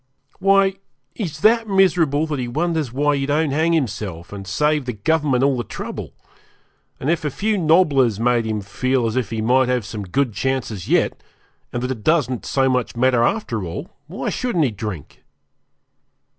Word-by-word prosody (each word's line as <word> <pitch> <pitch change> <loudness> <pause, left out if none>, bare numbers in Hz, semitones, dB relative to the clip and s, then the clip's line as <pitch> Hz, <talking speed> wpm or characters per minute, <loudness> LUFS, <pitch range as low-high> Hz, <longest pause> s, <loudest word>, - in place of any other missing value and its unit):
Why, 195 0 +3 0.4
he 215 - -3
is 155 -2 -7
that 225 +1 +4
miserable 170 -7 +3
that 150 -3 -3
he 125 - -2
wonders 155 0 -1
why 145 +3 +1
he 135 -1 -2
don't 150 0 +1
hang 160 +4 +2
himself, 105 - -3
and 100 -1 -8
save 150 +3 +1
the 125 - -3
Government 135 +3 +1
all 140 -1 +3
the 120 - -2
trouble; - - -7 0.9
and 130 - -4
if 165 0 +1
a 150 - 0
few 215 +9 -1
nobblers 150 - +3
make 120 0 +2
him 110 -1 -2
feel 125 +5 -1
as 110 - -1
if 125 -5 -1
he 110 -1 -3
might 125 +2 +3
have 125 -4 0
some 105 0 -6
good 120 +6 -1
chances 125 -7 -2
yet, - - +1 0.5
and 120 - -3
that 125 - -1
it 115 -5 -6
doesn't 145 -7 +1
so 135 -1 +2
much 125 -2 0
matter 125 0 +3
after 120 - -1
all, 85 -1 -6 0.2
why 180 +6 -4
shouldn't 195 -12 0
he 125 - 0
drink? 105 -7 -7
130 Hz, 185 wpm, -21 LUFS, 115-160 Hz, 0.9 s, that